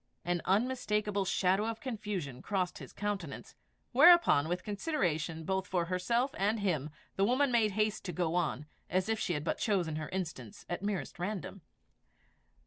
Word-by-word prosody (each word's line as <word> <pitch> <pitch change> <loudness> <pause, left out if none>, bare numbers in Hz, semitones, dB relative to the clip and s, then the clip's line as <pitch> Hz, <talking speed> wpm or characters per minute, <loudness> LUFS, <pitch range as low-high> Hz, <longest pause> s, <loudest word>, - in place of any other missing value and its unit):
An 175 -1 0
unmistakable 210 -2 +1
shadow 190 +3 +2
of 225 0 -3
confusion 205 - -4
crossed 185 -3 -1
his - - -10
countenance; 200 -7 -4 0.4
whereupon 290 - +7
with 180 +1 -2
consideration 175 - -1
both 190 +2 -1
for 175 -2 0
herself 235 +9 0
and 210 +3 +2
him, 155 -7 0 0.3
the 195 - +3
woman 255 +5 +3
made 220 -4 +3
haste 215 +1 0
to 180 - -2
go 170 -1 -1
on, 160 -5 0 0.2
as 185 +3 0
if 220 -1 +1
she 180 - 0
had 150 -2 -2
but 160 - -1
chosen 180 -8 0
her 155 -1 -4
instance 160 - -5
at 175 - -3
merest 195 -7 -3
random. 195 0 -4
190 Hz, 160 wpm, -32 LUFS, 175-215 Hz, 0.4 s, whereupon